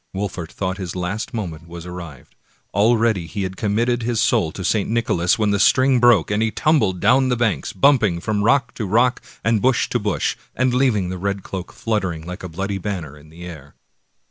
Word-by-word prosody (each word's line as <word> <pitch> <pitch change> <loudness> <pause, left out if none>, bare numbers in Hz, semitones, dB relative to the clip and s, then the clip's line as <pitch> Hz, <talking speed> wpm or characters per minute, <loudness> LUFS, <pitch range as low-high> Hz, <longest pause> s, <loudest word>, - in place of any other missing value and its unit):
Wolfert 95 -4 -4
thought 95 0 -3
his 90 -2 -5
last 90 +4 -3
moment 85 -8 -5
was 85 0 -9
arrived; 85 -7 -9 0.4
al 110 +4 +4
ready 110 -7 +1
had - - -15
he 100 -3 -2
committed 115 +5 0
his 115 -1 -1
soul 110 -8 +2
to 95 - -6
St. 105 +2 +1
Nicholas, 110 -7 +1
when 105 -2 +1
the 100 - +1
string 130 +3 +4
broke, 120 -7 +4
and 105 +1 +1
he 110 - +2
tumbled 125 - +1
down 130 +4 +3
the 125 - +2
bank, 115 -5 0
bumping 110 -9 +4
from 105 +3 -1
rock 125 +3 +2
to 110 - -4
rock 120 +5 +2 0.2
and 110 -1 +2
bush 130 -1 +2
to 120 - 0
bush, 105 -3 -1 0.2
and 130 0 +1
leaving 120 -8 +2
the 90 0 -5
red 100 +1 -2
cloak 95 -2 -6
fluttering 95 -8 -2
like 90 +1 -7
a 90 - -6
bloody 95 +4 -3
banner 85 -7 -5
in 75 +1 -16
the 85 +2 -11
air. 75 -5 -11
100 Hz, 205 wpm, -21 LUFS, 90-115 Hz, 0.4 s, al